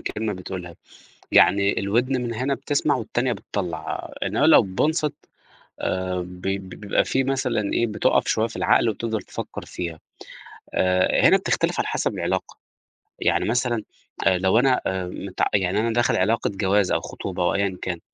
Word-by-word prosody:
كلمة 110 -1 -3
بتقولها، 90 -2 -7 0.6
يعني 100 0 +4
الودن 120 +6 +1
مِن 115 -1 -3
هِنا 130 +4 0
بتسمَع 145 +2 0
والتانية 120 +1 -1
بتطّلع، 90 -6 -5
إنما - - +2
لو - - +8
بينصِت 150 - 0 0.7
آآ 95 0 -1
ب 90 0 -8
ب 95 -1 -2
بيبقى 100 +2 0
في 135 - 0
مثلًا 125 -6 -1
إيه، 120 - +2
بتُقف 105 -2 +1
شوية 110 - +2
في - - -9
العقل 120 - +3
وتفضَل 110 +1 -3
تفكّر - - -7
فيها، 85 -3 -6 0.7
آآ، 90 0 +3
هِنا - - +6
بتختلف - - 0
على - - -1
حسب - - -1
العلاقة، - - -2 0.6
يعني - - +1
مثلًا 120 -1 0 0.4
آآ 95 -1 +4
لو 95 +4 +3
أنا 130 0 +3
آآ 95 -1 -2
مت 95 +1 -6
يعني 95 0 +1
أنا 115 +1 0
داخل 120 +1 +2
علاقة 110 +5 +1
جواز 95 0 +2
أو - - +1
خُطوبة 90 -2 -4
أو 90 - +2
أيًا 100 -2 0
كان، 90 -2 -3
100 Hz, 160 wpm, -23 LUFS, 95-120 Hz, 0.7 s, لو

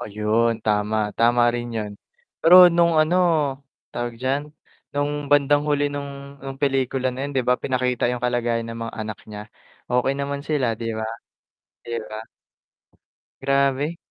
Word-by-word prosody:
Ayun, 110 +2 0
tama. 105 0 0
Tama 120 +1 +3
rin 120 0 -4
yun. 105 -1 -3 0.5
Pero 170 +3 +7 0.2
nung 170 -1 +3
ano 155 +3 +3 0.8
tawag 120 0 -4
diyan, 135 +3 0 0.5
nung 145 0 -2
bandang 145 0 +4
huli 145 0 +1
nung 140 0 -4 0.3
nung 135 0 -7
pelikula 135 -2 0
na 130 - -9
yun - - -7
di 130 - +2
ba 125 0 +2
pinakita 125 -2 0
yung 125 0 -3
kalagayan 120 -1 0
ng 115 0 -6
mga - - -9
anak 110 -2 -5
niya. 105 0 -7 0.5
Okey 125 +2 +2
naman 140 0 -3
sila, 145 -5 +1
di 115 - -3
ba? 110 - -2 0.8
Di 120 - -6 0.2
ba? 110 +1 -6 1.2
Grabe. 140 +3 +1
130 Hz, 150 wpm, -23 LUFS, 115-140 Hz, 1.2 s, Pero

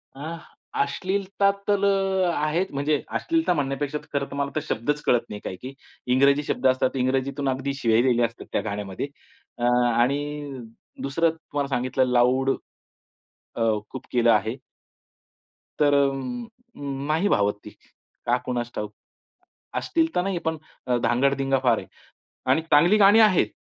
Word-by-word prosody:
अ, 155 +5 -6 0.4
अश्लीलता 195 +7 0 0.2
तर 205 -1 +2 0.5
आहेत. 155 +5 0
म्हणजे 145 +1 0 0.2
अश्लीलता 325 - +1
म्हणण्यापेक्षा, 145 -1 -2 0.2
खरं 140 -1 0
तर - - -6
मला 140 0 -1
तर - - +2
शब्दच 145 +6 -1
कळत 120 - +4
नाही 105 - -6
काही - - -5
की, 130 +2 -7 0.4
इंग्रजी 140 +3 +4
शब्द 135 -2 0
असतात 130 0 +2
इंग्रजीतून 135 +2 0
अगदी 135 +1 -2
शिव्या 115 -4 +2
दिल्या 120 -2 +3
असतात 115 0 -7
त्या - - 0
गाण्यामध्ये. 100 +2 -4 0.5
अ, 120 - -5 0.3
आणि 140 +2 -1 0.4
दुसरं 165 +5 +1
तुम्हाला 145 -3 -4
सांगितलं 130 +1 +1
लाउड, 125 +2 +3 1.1
अ, - - -3 0.3
खूप 130 - -8
केलं 120 -1 +4
आहे. 110 +3 +1 1.2
तर 145 -1 +4
अ, 140 -1 +5
अ, 240 - -7 0.3
नाही 160 +7 +1
भावत 105 0 +2
ती, - - -7 0.6
का 120 +1 +3
कुणास 120 -1 -2
ठाऊक. 105 0 -4 0.8
अश्लील 330 -1 +1
तर - - +3
नाही, 195 -1 -1
पण 160 0 0 0.5
धांगडधिंगा 135 +2 +2
फार 120 -3 +4
आहे - - -7 0.6
आणि 140 +5 +3
चांगली 165 +5 +4
गाणी 205 +2 +7
आहेत, 195 - +5
140 Hz, 140 wpm, -24 LUFS, 125-160 Hz, 1.2 s, गाणी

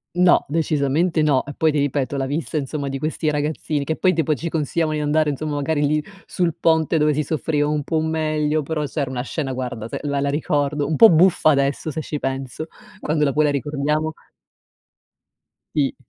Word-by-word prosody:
No, 180 0 +4
decisamente 155 +1 +1
no, 140 -4 +3
e 145 - -9
poi 160 -1 +3
ti 150 - 0
ripeto 140 -1 -1
la 135 -1 -1
vista 155 +2 -3
insomma 145 0 -3
di 135 0 -3
questi 155 +1 -1
ragazzini 150 0 -2
che 160 +3 -2
poi 185 +2 +2
tipo 155 -2 +1
ci 165 - -5
consigliavan 160 0 -1
di 150 - -1
andare 150 +1 +2
insomma, 150 +1 -3
magari 145 +1 0
lì 150 +1 0 0.2
sul 175 -3 0
ponte, 160 -1 +2
dove 150 -1 +2
si 150 - 0
soffriva 150 0 -1
un 150 0 0
po' 160 +2 -1
meglio 155 -1 0
però 150 +1 -2
c'era 140 -1 -3
una 125 -1 -3
scena 135 0 -3
guarda 125 -4 -4
se - - -5
la 140 -1 -1
la 140 - 0
ricordo, 145 -1 0
un 150 +1 -1
po' 225 - +9
buffa 170 -1 +4
adesso 140 +1 +1
se 160 +1 -3
ci 150 - -4
penso 135 +3 -4 0.3
quando 150 0 0
la 140 - +1
vuoi 155 +2 +2
la 145 - +2
ricordiamo. 150 +2 -1 1.6
Sì. 140 -3 +1
150 Hz, 200 wpm, -21 LUFS, 140-155 Hz, 1.6 s, po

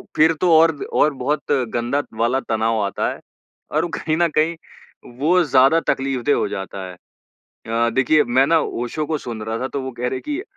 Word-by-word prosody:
फिर 160 +2 +5
तो 180 - +3
और 160 0 +5 0.2
और 150 - +3
बहुत 140 +3 -2 0.2
गंदा 120 +4 0 0.2
वाला 120 +3 +2
तनाव 110 0 +1
आता 100 - -1
है - - -12 0.5
और 155 +3 +1
कहीं 155 0 -1
न 170 0 +3
कहीं 160 +2 +2 0.6
वो 175 +5 +3
ज़्यादा 135 +1 +4
तकलीफ़देह 135 +1 0
हो - - 0
जाता 95 0 -6
है। - - -9 0.7
अ, 115 +1 +1
देखिए 135 +5 +3
मैं 130 +3 +3
ना 165 +2 +4
ओशो 135 +3 -3
को 155 0 -1
सुन 115 -5 -7
रहा 110 +1 -3
था 130 - -3
तो 140 - -4
वो 130 - -5
कह 120 - -10
रहे 130 - -3
हैं - - -13
कि 300 +5 -2
135 Hz, 200 wpm, -20 LUFS, 120-155 Hz, 0.7 s, फिर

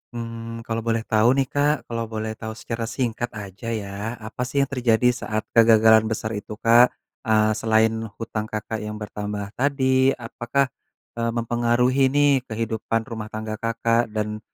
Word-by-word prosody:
mmm, 115 0 -6
kalau 115 0 -2
boleh 115 0 0
tahu 110 +2 +4
nih 135 - +1
Kak 145 +1 0
kalau 115 -1 -3
boleh 110 0 -3
tahu 110 0 -6
secara 115 -1 -4
singkat 120 -1 -2
aja 105 +2 -7
ya 105 +2 -4
apa 110 +3 -5
sih 140 +3 -1
yang 140 - +3
terjadi 125 -3 +2
saat 110 -2 -3
kegagalan 110 -1 +6
besar 110 0 -2
itu 105 +1 -6
Kak, 120 +2 +6 0.4
eee, 110 0 +4
selain 110 0 +3 0.2
hutang 110 -1 -4
Kakak 110 +1 -4
yang 105 0 -5
bertambah 105 -1 -5
tadi 130 -1 +2
apakah, 120 +3 -1 0.5
eee, 115 0 0
mempengaruhi 120 +3 +1
nih 145 +1 +4 0.2
kehidupan 115 0 -1
rumah 110 -2 -6
tangga 110 0 -5
Kakak 115 +1 +1
dan, 105 0 -3
115 Hz, 155 wpm, -23 LUFS, 110-120 Hz, 0.5 s, kegagalan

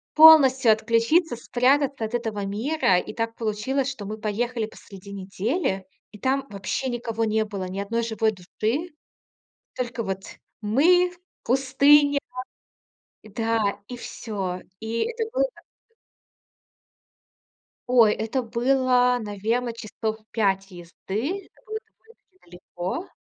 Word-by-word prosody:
Полностью 275 -6 +8
отключиться, 230 +9 +2
спрятаться 260 +2 +1
от 220 - -7
этого 220 -4 -2
мира. 215 - +1
И - - -3
так 230 0 -3
получилось, 235 +5 -1
что 235 -7 -7
мы 215 +2 -5
поехали 225 +2 -2
посреди 200 -2 -12
недели, 195 - -2 0.3
и 210 - -12
там 270 +3 0
вообще 205 +6 -3
никого 230 -2 -2
не 220 0 +1
было, 200 -3 -5
ни 190 +2 -5
одной 230 +4 -1
живой 220 -1 +1
души. 220 - -3 0.9
Только 240 -2 -3
вот 190 -1 -3 0.4
мы, 340 +12 +4 0.3
пустыня 280 +3 +4 1.0
Да, 215 -1 -1
и 245 - -7
всё. 195 -6 -5 0.2
И 225 +1 -2
это 465 -1 -2
было - - +3 2.4
Ой, 235 -4 +6
это 225 +4 -2
было, 250 +1 +2
наверно, 220 +4 -1
часов 220 -1 -4
5 195 -3 0
езды. 200 - -5
Это - - -26
было 435 0 -4
довольно-таки 445 -4 -26
далеко. 180 - -6
230 Hz, 115 wpm, -25 LUFS, 210-265 Hz, 2.4 s, Полностью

